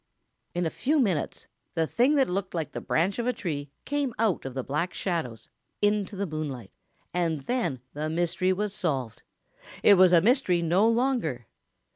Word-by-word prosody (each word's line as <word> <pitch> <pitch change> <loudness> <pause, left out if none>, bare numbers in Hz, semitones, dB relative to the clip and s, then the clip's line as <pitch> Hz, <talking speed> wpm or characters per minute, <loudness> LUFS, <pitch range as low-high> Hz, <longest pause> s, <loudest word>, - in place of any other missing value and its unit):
In 175 0 0
a 160 - -1
few 300 +3 +1
minutes 190 - 0 0.3
the 165 -1 +2
thing 250 - +2
that 270 -2 +4
looked 190 0 -3
like 160 -2 -2
the - - -5
branch 185 +8 0
of 235 - -1
a 250 - +2
tree 145 - -4 0.2
came 285 -4 -1
out 215 -10 +1
of 135 -1 -6
the 130 - -2
Black 150 +7 -2
Shadows 140 - -3 0.3
into 205 -1 +1
the 200 +1 -2
moonlight, 145 - -5 0.4
and 165 -4 0
then 185 - -1
the 150 +2 -3
mystery 175 +3 +1
was 200 +2 -1
solved. 135 - -2 0.6
It 200 -3 +7
was 185 -1 +7
a 175 - +7
mystery 190 - +3
no 180 +6 +3
longer. 230 - 0
180 Hz, 175 wpm, -27 LUFS, 155-210 Hz, 0.6 s, It